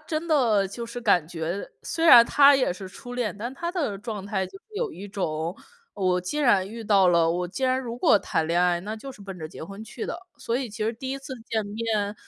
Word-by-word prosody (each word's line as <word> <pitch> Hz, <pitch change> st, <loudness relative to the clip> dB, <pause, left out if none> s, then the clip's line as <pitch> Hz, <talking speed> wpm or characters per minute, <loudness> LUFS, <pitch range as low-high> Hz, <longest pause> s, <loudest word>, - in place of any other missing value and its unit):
真 310 Hz, +2 st, -4 dB
的 225 Hz, -10 st, +3 dB
就 235 Hz, +4 st, -6 dB
是 235 Hz, +1 st, -7 dB
感 175 Hz, -8 st, +3 dB
觉 170 Hz, +3 st, -4 dB, 0.2 s
虽 330 Hz, -, -2 dB
然 245 Hz, -7 st, +10 dB
他 285 Hz, 0 st, +7 dB
也 265 Hz, -7 st, +2 dB
是 185 Hz, +2 st, -6 dB
初 245 Hz, +6 st, -9 dB
恋， 240 Hz, -5 st, -1 dB
但 240 Hz, +4 st, -4 dB
他 340 Hz, +4 st, -4 dB
的 285 Hz, -, -1 dB
状 205 Hz, -1 st, -6 dB
态 195 Hz, -2 st, -1 dB
就 390 Hz, -, -13 dB
是 -, -, -44 dB
有 460 Hz, -2 st, -2 dB
一 200 Hz, +2 st, -9 dB
种， 170 Hz, -2 st, -3 dB, 0.4 s
我 185 Hz, -2 st, +1 dB
既 185 Hz, +12 st, -4 dB
然 205 Hz, -9 st, +3 dB
遇 225 Hz, +1 st, -8 dB
到 195 Hz, -3 st, +5 dB
了， 170 Hz, -1 st, +4 dB
我 180 Hz, +1 st, -1 dB
既 260 Hz, +9 st, -3 dB
然 260 Hz, 0 st, +2 dB
如 240 Hz, -2 st, -5 dB
果 210 Hz, -, +5 dB
谈 160 Hz, -4 st, -1 dB
恋 170 Hz, +2 st, +2 dB
爱， 175 Hz, -1 st, +3 dB
那 210 Hz, +4 st, -5 dB
就 270 Hz, +5 st, -8 dB
是 210 Hz, -, -12 dB
奔 195 Hz, -2 st, -8 dB
着 155 Hz, -, -6 dB
结 160 Hz, -, -9 dB
婚 195 Hz, +5 st, -9 dB
去 225 Hz, +1 st, -7 dB
的。 340 Hz, -, -4 dB, 0.2 s
所 230 Hz, -, -3 dB
以 255 Hz, 0 st, -1 dB
其 215 Hz, +1 st, -4 dB
实 225 Hz, -, 0 dB
第 260 Hz, +3 st, -6 dB
1 275 Hz, -, -2 dB
次 270 Hz, 0 st, -9 dB, 0.2 s
见 220 Hz, -2 st, 0 dB
面， 210 Hz, -1 st, -2 dB
215 Hz, 265 characters per minute, -25 LUFS, 185-255 Hz, 0.4 s, 然